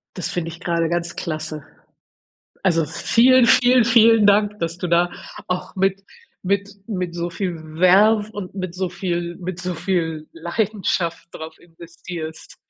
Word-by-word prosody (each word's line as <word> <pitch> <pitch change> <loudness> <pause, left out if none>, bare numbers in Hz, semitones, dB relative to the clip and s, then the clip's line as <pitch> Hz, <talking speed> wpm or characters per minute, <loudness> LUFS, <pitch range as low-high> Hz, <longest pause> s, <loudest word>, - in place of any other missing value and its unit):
Das 180 - -4
finde 165 -2 -3
ich 165 - -10
grade 170 -2 -1
ganz 175 0 -2
klasse. 155 -2 -5 1.0
Also, 165 -4 +2
vielen, 235 - +4
vielen, 245 +1 +5
vielen 225 -2 +5
Dank, 205 +1 +3
dass 165 -1 -3
du 180 - -3
da 175 +1 +3 0.4
auch 180 0 -3
mit 195 +1 0 0.4
mit 200 +1 0 0.2
mit 180 -5 -4
so 175 0 -3
viel 180 -1 -3 0.2
Verve 205 +4 +5
und 195 -3 -7
mit 185 -3 -5
so 185 0 -2
viel 175 -2 -3
mit 180 -1 -6
so 180 0 -3
viel 165 -3 -2
Leidenschaft 170 -1 -2
drauf 160 0 -9
investierst. 165 -1 -10
180 Hz, 145 wpm, -21 LUFS, 170-200 Hz, 1.0 s, vielen